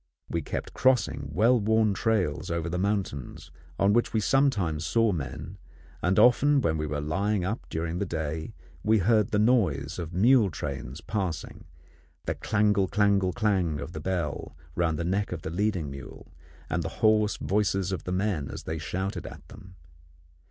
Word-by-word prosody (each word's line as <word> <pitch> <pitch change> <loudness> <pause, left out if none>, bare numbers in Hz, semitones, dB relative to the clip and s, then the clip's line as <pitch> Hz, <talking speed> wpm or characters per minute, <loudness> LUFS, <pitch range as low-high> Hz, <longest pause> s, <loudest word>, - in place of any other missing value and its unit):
We - - 0
kept - - -5
crossing 125 - +1
well 115 - +4
worn 110 0 +2
trails 95 - 0
over 85 -1 -2
the 90 +2 -2
mountains, 95 - -3 0.3
on 100 +1 +3
which 120 0 +1
we 110 - +2
sometimes 105 - +1
saw 115 +6 +2
men, 75 +4 -5 0.4
and 90 +1 +1
often 140 +4 +5
when 80 - 0
we 75 - -2
were 75 0 -2
lying 95 +6 0
up 110 +5 -3
during 80 +2 -3
the - - 0
day 80 -1 -4 0.3
we 110 +4 +3
heard 105 +1 +3
the 105 - 0
noise 95 - +2
of 85 -2 -5
mule 110 +4 +4
trains 70 -2 -6
passing, 95 -7 -4 0.6
the - - 0
clangle 105 -2 +1
clangle 100 -3 +2
clang 95 -9 +1
of 70 - -6
the 80 - -6
bell 85 -6 -3 0.2
round 80 -1 0
the 85 - -2
neck 100 +4 0
of 85 -3 -5
the - - -4
leading 90 -5 -1
mule, 70 -1 -10 0.3
and - - -1
the - - -3 0.2
hoarse 105 -1 +3
voices 95 -2 0
of 95 -4 -3
the 90 - -3
men 90 -7 -1
as - - -7
they 80 0 -4
shouted 95 +3 -3
at 75 -1 -11
them. 95 -4 -13
95 Hz, 175 wpm, -27 LUFS, 80-105 Hz, 0.6 s, often